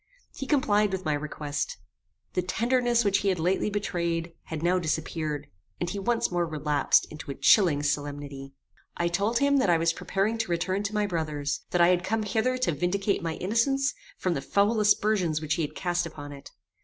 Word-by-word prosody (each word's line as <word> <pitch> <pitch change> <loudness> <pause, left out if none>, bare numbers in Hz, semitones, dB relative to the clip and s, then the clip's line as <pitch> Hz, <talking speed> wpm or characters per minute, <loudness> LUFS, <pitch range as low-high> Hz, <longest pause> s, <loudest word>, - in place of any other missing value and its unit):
He 270 - -6
complied 210 -8 +2
with 190 -1 -3
my 155 - +1
request. 150 0 -3 0.6
The 180 - +1
tenderness 235 +5 +1
which 200 -1 +3
he 200 - -2
had 190 -2 +2
lately 180 +5 +1
betrayed, 170 -5 -2
had 160 -1 -5
now 180 +2 +3
disappeared, 155 -2 -2 0.3
and 175 0 -2
he 200 - -3
once 230 +1 0
more 175 -1 0
relapsed 150 -2 +2
into 155 -1 -9
a 140 - -3
chilling 165 - +4
solemnity. 145 -2 -3 0.4
I 170 - +1
told 200 +7 +1
him 280 +1 +3
that 260 -8 +2
I 170 - +5
was 165 +1 +2
preparing 205 +7 -1
to 230 - -1
return 175 +3 0
to 200 - -3
my 210 0 +2
brother's; 150 -6 -2
that 175 - +1
I 170 - +6
had 180 -1 +2
come 220 +3 0
hither 230 +4 0
to 255 -8 +1
vindicate 195 +6 0
my 165 -1 -2
innocence 270 +8 +1 0.2
from 185 - 0
the 140 - -2
foul 205 +8 +2
aspersions 205 -6 +2
which 155 0 -1
he 165 - -1
had 150 - -3
cast 175 -1 -1
upon 145 -3 -9
it. 140 -1 -10
175 Hz, 195 wpm, -27 LUFS, 155-210 Hz, 0.6 s, I